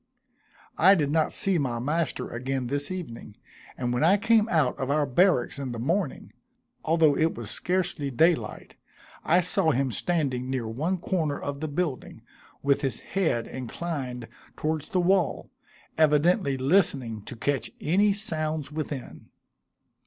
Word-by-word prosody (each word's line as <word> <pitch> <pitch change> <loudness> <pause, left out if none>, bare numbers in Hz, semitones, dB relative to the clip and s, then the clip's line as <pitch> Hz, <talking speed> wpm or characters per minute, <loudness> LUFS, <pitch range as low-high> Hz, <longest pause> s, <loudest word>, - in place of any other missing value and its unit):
I 190 +4 +7
did 145 -5 0
not 160 0 +2
see 190 -3 0
my 125 -5 -1
master 150 +5 -1
again 130 +2 -3
this 145 +3 -2
evening, 135 - -7 0.4
and 120 -1 -1
when 125 - 0
I 185 +5 +5
came 225 +1 +3
out 155 -7 +2
of 130 0 -2
our 150 +1 +2
barracks 140 -1 +2
in 130 -3 -4
the - - -5
morning, 160 - -2 0.5
although 160 -2 +3
it 160 +2 +1
was 115 -2 -6
scarcely 180 -5 -1
daylight, 160 +6 0 0.5
I 180 +3 +4
saw 180 -1 +1
him 135 -2 +1
standing 130 - -1
near 130 -4 -2
one 155 +12 -1
corner 165 -5 -1
of 140 0 -5
the 155 - -3
building, 150 -2 -3 0.4
with 140 0 +2
his 135 -3 -2
head 160 -12 -1
inclined 130 -2 -5 0.3
towards 155 -1 -2
the 185 - 0
wall, 180 -1 +1 0.5
evidently 155 0 +3
listening 130 - +1
to - - -8
catch 130 0 -1
any 200 +6 +3
sounds 155 -7 -1
within. 150 -4 -6
150 Hz, 145 wpm, -26 LUFS, 130-175 Hz, 0.5 s, I